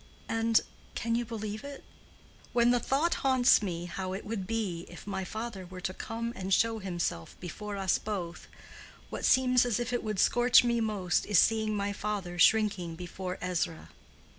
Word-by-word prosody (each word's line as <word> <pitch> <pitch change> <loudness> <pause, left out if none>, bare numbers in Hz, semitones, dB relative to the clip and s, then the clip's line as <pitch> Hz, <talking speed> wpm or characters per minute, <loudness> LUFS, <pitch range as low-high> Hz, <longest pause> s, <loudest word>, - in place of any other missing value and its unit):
And—can 225 0 -1
you 240 +1 0
believe 215 -2 -5
it? 280 -1 -8 0.7
when 240 0 +4
the 245 - +3
thought 290 +8 +1
haunts 260 -4 +5
me 175 -4 -3
how 185 +1 -4
it 195 - -6
would 205 -4 -4
be 200 -7 -2
if 175 - -11
my 190 -1 -3
father 215 0 -5
were 185 +1 -9
to 185 +1 -3
come 230 +2 -4
and 190 0 -5
show 225 +3 +3
himself 175 - -3
before 205 +4 -6
us 190 -2 +1
both, 180 -5 -5 0.6
what - - -3
seems 255 -1 +5
as 245 -2 0
if 240 +1 -2
it 245 - -1
would 215 -2 -3
scorch 245 +5 +5
me 235 -1 +1
most 205 -5 0
is 205 -3 +3
seeing 220 +2 +3
my 200 0 -1
father 200 -4 -4
shrinking 195 -4 +3
before 180 +1 -6
Ezra. 175 -3 -2
210 Hz, 170 wpm, -30 LUFS, 185-230 Hz, 0.7 s, haunts